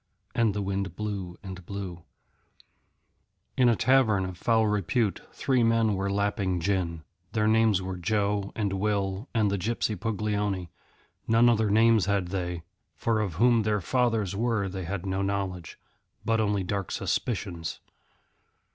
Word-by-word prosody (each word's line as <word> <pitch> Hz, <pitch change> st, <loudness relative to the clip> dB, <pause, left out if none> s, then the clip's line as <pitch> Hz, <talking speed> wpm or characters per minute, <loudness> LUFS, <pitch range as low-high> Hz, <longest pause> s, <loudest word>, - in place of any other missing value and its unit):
And 115 Hz, -4 st, +2 dB
the 105 Hz, -, -1 dB
wind 95 Hz, -2 st, -2 dB
blew 100 Hz, -4 st, -4 dB
and 95 Hz, -2 st, -8 dB
blew. 90 Hz, -2 st, -6 dB, 1.5 s
In 125 Hz, -2 st, +5 dB
a 115 Hz, -, +4 dB
tavern 110 Hz, -7 st, +3 dB
of 95 Hz, -1 st, -6 dB
foul 110 Hz, +4 st, +2 dB
repute 105 Hz, +1 st, 0 dB
three 130 Hz, -2 st, +1 dB
men 115 Hz, -2 st, +3 dB
were 100 Hz, 0 st, -1 dB
lapping 100 Hz, -2 st, 0 dB
gin. 85 Hz, -3 st, -1 dB, 0.3 s
Their 110 Hz, -1 st, +1 dB
names 110 Hz, -3 st, +3 dB
were 95 Hz, 0 st, -4 dB
Joe 100 Hz, +1 st, 0 dB
and 100 Hz, -3 st, -1 dB
Will 100 Hz, +1 st, -1 dB
and 105 Hz, -3 st, +3 dB
the 100 Hz, -, -1 dB
gypsy 110 Hz, +2 st, -1 dB
Puglioni; 105 Hz, -3 st, -2 dB, 0.6 s
none 115 Hz, +2 st, +5 dB
other 110 Hz, -3 st, +3 dB
names 110 Hz, -1 st, +4 dB
had 100 Hz, -3 st, 0 dB
they, 90 Hz, -3 st, -3 dB, 0.3 s
for 115 Hz, -2 st, 0 dB
of 100 Hz, -7 st, -2 dB
whom 120 Hz, +4 st, +4 dB
their 105 Hz, -1 st, +1 dB
fathers 110 Hz, -2 st, 0 dB
were 110 Hz, -2 st, 0 dB
they 95 Hz, -1 st, -5 dB
had 95 Hz, +1 st, -4 dB
no 95 Hz, 0 st, -1 dB
knowledge, 95 Hz, -3 st, -3 dB, 0.5 s
but 115 Hz, 0 st, +2 dB
only 105 Hz, -2 st, +1 dB
dark 100 Hz, +1 st, -3 dB
suspicions. 90 Hz, -7 st, -2 dB
100 Hz, 145 wpm, -27 LUFS, 95-110 Hz, 1.5 s, In